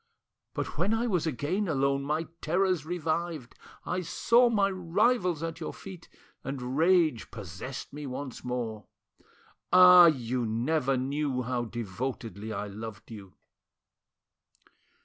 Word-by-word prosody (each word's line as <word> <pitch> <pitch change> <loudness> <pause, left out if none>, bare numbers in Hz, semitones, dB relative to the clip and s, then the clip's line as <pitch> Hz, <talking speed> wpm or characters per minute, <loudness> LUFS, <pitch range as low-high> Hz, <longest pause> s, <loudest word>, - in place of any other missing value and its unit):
But - - -4
when 220 - +2
I 230 +2 0
was 180 -8 0
again 160 - -1
alone 140 -3 +1
my 150 +3 -1 0.2
terrors 180 -1 +1
revived, 165 -5 -3 0.3
I 180 +1 -1
saw 235 +8 +3
my 200 -3 +2
rivals 185 -1 +1
at 165 0 -4
your 160 - -5
feet, 185 -4 -11 0.3
and 130 -1 -4
rage 165 -5 +3
possessed 105 +8 -8
me 145 0 -6
once 130 0 -6
more. 120 -4 -4 0.8
Ah! 180 -1 +9
you 125 -5 0
never 130 +5 0
knew 135 0 -1
how 120 0 -2
devotedly 115 -1 -5
I 105 -1 -3
loved 105 0 -9
you." 100 -4 -11
145 Hz, 125 wpm, -29 LUFS, 120-175 Hz, 0.8 s, Ah